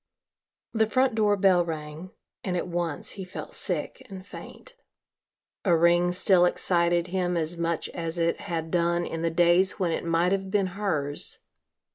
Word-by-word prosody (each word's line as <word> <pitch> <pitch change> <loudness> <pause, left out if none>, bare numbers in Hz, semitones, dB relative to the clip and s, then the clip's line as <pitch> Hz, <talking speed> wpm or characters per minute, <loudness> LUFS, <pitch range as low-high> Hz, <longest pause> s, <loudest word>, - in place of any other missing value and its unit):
The 220 -1 +2
front 255 +1 +2
door 210 -2 +2
bell 185 -3 +4
rang 160 +1 -6 0.3
and 180 -2 -2
at - - -3
once, 170 -3 -2
he 195 - -7
felt 185 - -8
sick - - -3
and 190 -1 -9
faint. 200 - -11 0.9
A 175 -5 +3
ring 175 +1 +3
still 180 0 +4
excited 175 -1 +1
him 180 -1 -1
as 165 +1 0
much 170 -1 -2
as 165 0 -4
it 170 0 0
had 165 -1 -4
done 170 0 +1
in 165 - -5
the 165 - +1
days 175 +3 +3
when 180 -3 0
it - - -2
might 170 +2 +1
have 195 -1 -1
been 195 -1 +1
hers. 155 -8 -2
175 Hz, 165 wpm, -26 LUFS, 170-190 Hz, 0.9 s, bell